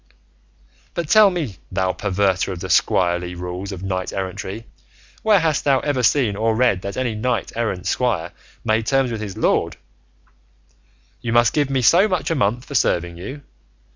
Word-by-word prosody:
But 170 -3 -3
tell 215 +1 +7
me, 155 - -4
thou 95 0 0
perverter 95 -1 0
of 90 - -6
the - - -6
squirely 90 -1 +2
rules 90 +3 -5
of 95 -1 -7
knight 95 -1 -3
errantry, 100 +3 -5 0.6
where 215 -3 +4
hast 160 -3 +1
thou 135 -2 +3
ever 145 -3 0
seen 120 -3 +2
or 110 +2 +1
read 110 -6 +2
that 100 +1 -6
any 125 -3 -1
knight 120 +4 -2
errant's 110 -6 -2
squire 105 -10 -1 0.3
made 110 0 0
terms 135 -2 +2
with 110 -2 -4
his 100 -3 -6
lord, - - +1 1.4
'you 115 - -3
must 120 -1 +4
give 145 -2 +1
me 135 -2 0
so 180 - +5
much 185 -4 -1
a - - +1
month 120 0 0
for - - -9
serving 85 -9 +1
you'? 130 +11 -8
110 Hz, 170 wpm, -21 LUFS, 95-135 Hz, 1.4 s, tell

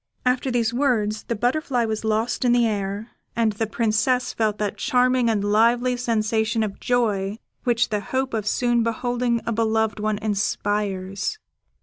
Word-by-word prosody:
After 250 +1 +1
these 240 -2 +1
words, 225 -5 0
the 235 - -2
butterfly 245 +2 0
was 220 -1 -3
lost 220 +3 0
in 245 -1 +4
the 240 -1 +4
air; 205 0 -3 0.2
and 225 -2 +2
the 215 +2 -2
Princess 230 +3 +1
felt 215 -2 0
that 210 -2 -2
charming 255 -2 +2
and 210 -3 +1
lively 235 +4 +3
sensation 220 -2 0
of 200 -2 -4
joy 210 -5 0 0.3
which 240 -1 +2
the 210 - 0
hope 260 +5 -2
of 215 -2 -2
soon 240 +1 +2
beholding 235 +1 0
a 230 - -1
beloved 220 -1 0
one 215 0 0
inspires. 205 - -1
225 Hz, 155 wpm, -23 LUFS, 210-245 Hz, 0.3 s, in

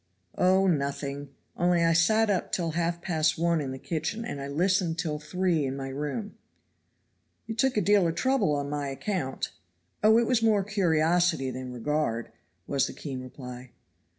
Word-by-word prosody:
"Oh, 190 +1 +4
nothing; 140 -3 -1 0.3
only 175 -1 +2
I 165 0 +4
sat 215 +6 +4
up 190 - -1
till 170 -3 -1
halfpast 170 -1 0
one 170 -1 +2
in 140 - -4
the 130 - -5
kitchen, 165 - -3
and 145 -12 -5
I 140 - -4
listened 175 +3 +1
till 155 -3 -2
three 170 +1 0
in 135 0 -2
my 135 -1 -4
room. 150 - -4 1.1
"You 225 - -4
took 250 +1 +1
a - - +4
deal 200 -1 +4
of 165 - -2
trouble 260 - +2
on 145 0 -2
my 145 -1 -3
account." 140 0 -3 0.5
"Oh, 220 +1 +6
it 235 - +3
was 245 -1 +2
more 215 -3 +3
curiosity 175 -6 +2
than 130 0 -6
regard," 125 -2 -2 0.3
was 140 -1 +1
the - - -7
keen 135 -4 -6
reply. 125 -1 -9
165 Hz, 170 wpm, -28 LUFS, 140-190 Hz, 1.1 s, Oh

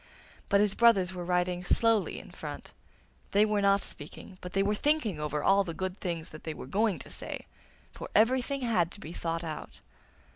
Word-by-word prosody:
But 200 0 +5
his 205 -2 +2
brothers 200 -6 +4
were 180 -1 -5
riding 180 0 0
slowly 225 +2 +3
in - - -10
front. - - -8 0.6
They 205 +2 +6
were 210 -1 +1
not 200 0 +4
speaking, 170 +5 -8
but 180 - -8
they 195 - +3
were 205 +1 +1
thinking 225 - +1
over 150 -1 -2
all 195 +1 +5
the 165 -4 -6
good 185 +2 -3
things 170 -3 -3
they 155 0 -7
were - - -8
going 205 - +1
to - - -10
say, - - -4 0.5
for - - -8
everything 260 +4 +3
had 215 -9 +2
to - - -9
be 170 -5 -8
thought 165 0 -3
out. 155 -2 -6
195 Hz, 190 wpm, -30 LUFS, 175-215 Hz, 0.6 s, They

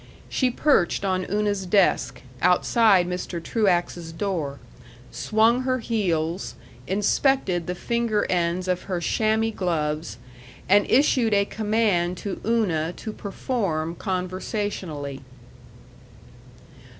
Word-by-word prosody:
She 255 - +1
perched 240 - +2
on 185 -1 0
Una's 205 -2 0
desk, 135 - +2 0.2
outside 185 +1 +4
Mr. 180 -1 -4
Truax's 175 -3 0
door, 165 -5 -3 0.5
swung 225 +3 +2
her 255 0 0
heels, 185 -7 -1 0.3
inspected 200 - +1
the 180 - -2
finger 235 +1 0
ends 175 +1 0
of 180 0 -1
her 180 -2 -1
chamois 220 +5 +1
gloves, 155 - -2 0.5
and 205 +2 +4
issued 245 -5 +3
a 200 0 +3
command 205 -5 0
to 200 +1 -5
Una 180 -8 0
to 220 - -7
perform 195 -7 -2
conversationally. 185 - -4
190 Hz, 100 wpm, -24 LUFS, 175-220 Hz, 0.5 s, outside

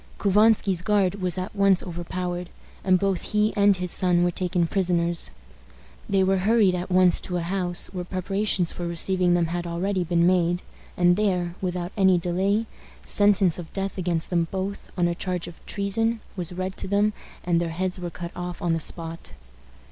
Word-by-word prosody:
Couvansky's 205 -2 +3
guard 195 -1 +1
was 180 -1 +1
at 185 +3 -4
once 195 -2 +3
overpowered, 175 0 -4 0.3
and 185 -1 +4
both 195 -1 0
he 210 +1 +2
and 200 -2 +4
his 180 -1 -4
son 175 -1 +3
were 175 - +2
taken 180 0 0
prisoners. 170 -2 +1 0.8
They 195 -1 +3
were 190 0 +2
hurried 210 -1 +3
at 180 +1 -3
once 180 -1 +4
to 180 - -2
a - - -1
house, 175 0 0
where 180 -1 -3
preparations 185 0 -1
for 175 - -5
receiving 175 +1 +1
them 175 -1 +2
had 175 +1 -3
already 180 +2 -1
been 170 0 +2
made, 175 -1 +2 0.3
and 175 0 +4
there, 180 -5 0
without 180 -1 -3
any 190 -3 +4
delay, 190 +5 0 0.4
sentence 195 -4 +3
of 170 - -8
death 195 0 -3
against 175 -3 -1
them 170 -2 +1
both, 195 +1 -5
on 175 -1 +2
a 170 - 0
charge 180 0 -3
of 170 - -12
treason, 225 +3 0 0.2
was 180 -2 -2
read 185 +1 -4
to - - -4
them, 205 +2 +2 0.3
and 170 -1 +1
their 170 - -2
heads 180 +2 -3
were 175 -1 -4
cut 170 0 -7
off 180 0 -5
on 170 -1 0
the 165 - 0
spot. 165 - -5
180 Hz, 185 wpm, -25 LUFS, 175-195 Hz, 0.8 s, and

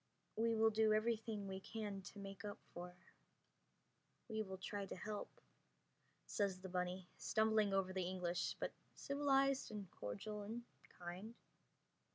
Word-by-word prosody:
"We 230 +1 +3
will 220 0 +6
do 220 0 +5
everything 220 -2 +1
we 190 0 -2
can 205 -1 -3
to 190 +2 -9
make 195 0 -6
up 205 -1 -3 0.2
for... 180 +1 -5 1.4
we 220 -1 +1
will 190 -3 -3
try 200 +1 -2
to - - -4
help," 210 +2 -3 1.0
says 195 -3 +1
the 190 0 -6
bunny, 180 0 -1
stumbling 220 -2 +4
over 190 -1 +2
the 185 -2 +1
English, 180 -1 0
but - - 0 0.2
civilized 275 -1 +3
and 210 -3 -4
cordial 210 - -3
and 225 +4 -4 0.3
kind. 180 +6 -5
205 Hz, 140 wpm, -42 LUFS, 185-220 Hz, 1.4 s, will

